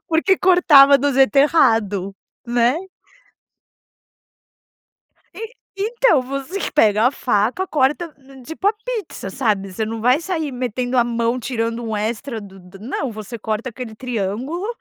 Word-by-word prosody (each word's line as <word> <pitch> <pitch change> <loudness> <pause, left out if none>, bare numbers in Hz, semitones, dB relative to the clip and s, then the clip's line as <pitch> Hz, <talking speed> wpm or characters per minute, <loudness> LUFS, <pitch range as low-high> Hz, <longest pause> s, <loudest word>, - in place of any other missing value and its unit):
Porque 335 +4 +2
cortava 305 -7 +6
do 285 +1 0
jeito 270 +1 +3
errado, 225 - +2 0.3
né. 240 +3 +2 2.6
E 450 +2 -8 0.3
então 450 - +2
você 275 +8 -5
que - - -4
pega 220 -5 +3
a - - +4
faca, 245 - 0
corta 300 +2 0 0.3
tipo 320 +7 -5
a 410 - +5
pizza, 485 -5 -5
sabe, 205 -6 -1
você 215 +4 -3
não 225 +1 -5
vai 250 +6 +3
sair 325 -4 -3
metendo 250 0 -3
a 240 - +4
mão, 235 +1 -1
tirando 230 -1 -3
um 220 -1 -3
extra 225 +3 -3
do 195 -2 -13
do 180 +1 -15
não. 250 +2 -4
Você 215 +2 -8
corta 220 +3 -3
aquele 235 -2 -8
triângulo 250 - -4
250 Hz, 140 wpm, -20 LUFS, 220-300 Hz, 2.6 s, cortava